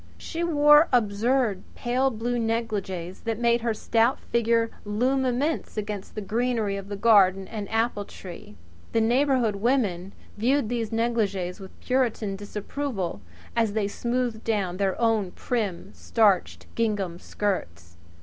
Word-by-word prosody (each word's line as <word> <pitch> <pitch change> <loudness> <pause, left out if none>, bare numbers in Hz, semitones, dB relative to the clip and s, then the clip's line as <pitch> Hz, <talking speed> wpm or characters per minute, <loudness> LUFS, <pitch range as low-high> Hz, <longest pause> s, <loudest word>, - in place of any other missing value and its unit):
She 335 0 -4
wore 295 -1 +6
absurd 230 -2 +2
pale 255 +3 +1
blue 240 +1 -2
kimonos 205 -6 -2
that 225 -1 -1
made 235 0 +2
her 230 -1 0
stout 230 +4 +2
figure 230 -1 +1
loom 250 +6 +1
immense 260 +2 -1
against 205 -2 -5
the 215 - -3
greenery 220 0 0
of 200 0 -6
garden 195 -4 +5
and 210 -2 -6
apple 225 -2 0
tree. 175 - -11 0.4
The 230 - +3
neighbourhood 245 -2 +2
women 200 -6 0 0.3
viewed 250 +1 +2
these 235 -3 -1
negligées 215 -6 -1
with 190 -1 -12
Puritan 235 -6 0
disapproval 205 - -4 0.3
as 225 -3 +2
they 210 -2 0
smoothed 235 +1 -2
down 195 -5 -1
their 195 -1 0
own 220 -5 +1
prim, 210 -8 -3
starched 205 -6 +1
gingham 205 -6 -1
skirts. 85 - -3
225 Hz, 130 wpm, -26 LUFS, 200-240 Hz, 0.4 s, wore